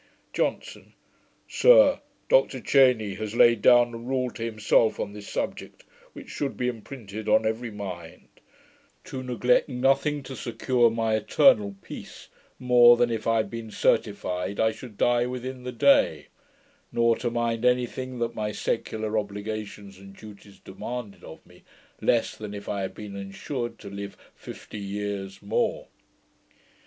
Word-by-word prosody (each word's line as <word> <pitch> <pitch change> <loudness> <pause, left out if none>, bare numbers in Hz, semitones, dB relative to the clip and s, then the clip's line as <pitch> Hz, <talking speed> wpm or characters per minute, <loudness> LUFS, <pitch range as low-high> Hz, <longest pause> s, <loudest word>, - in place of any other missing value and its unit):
JOHNSON. - - -3 0.5
'Sir, - - +6 0.3
Dr - - +3
Cheyne 125 -7 +3
has 110 +1 -5
laid 120 -2 +5
down 120 0 +5
a - - -5
rule 125 +1 -2
to 115 - -7
himself 110 0 +2
on 100 - -4
this 105 -1 -10
subject, - - -5 0.3
which - - -11
should 140 -2 -4
be 125 - -1
imprinted 110 -3 -6
on - - +4
every 115 +2 -2
mind: 95 -6 -8 0.8
"To 130 - -6
neglect 125 0 +1
nothing 135 +3 +1
to 130 0 -8
secure 120 0 +1
my 115 -1 -1
eternal 105 -1 +3
peace, - - -10 0.3
more 120 -1 +6
than 120 0 +2
if 115 -1 -3
I 115 0 +3
had 110 - -1
been 115 -1 -6
certified 90 -2 -1
I 110 0 +3
should 110 -2 -11
die 120 +1 +2
within 125 +1 -6
the 125 - -3
day: 280 - +3 0.6
nor 115 0 +3
to 120 - -2
mind 115 -1 -1
any 125 0 +3
thing 130 +1 -7
that 115 -1 -2
my 105 -1 -3
secular 110 +1 -2
obligations 105 -1 -7
and 100 0 -13
duties 105 -1 -14
demanded 115 +1 -7
of - - -12
me, - - -20 0.4
less 115 -2 +1
than 105 -1 -7
if 100 - -9
I 100 - -2
had 95 - -5
been 105 -2 -8
ensured 120 +6 -5
to 100 - -10
live 100 0 -7 0.2
fifty 105 - -10
years 100 -1 -5
more." 100 - -1
115 Hz, 150 wpm, -26 LUFS, 105-125 Hz, 0.8 s, Sir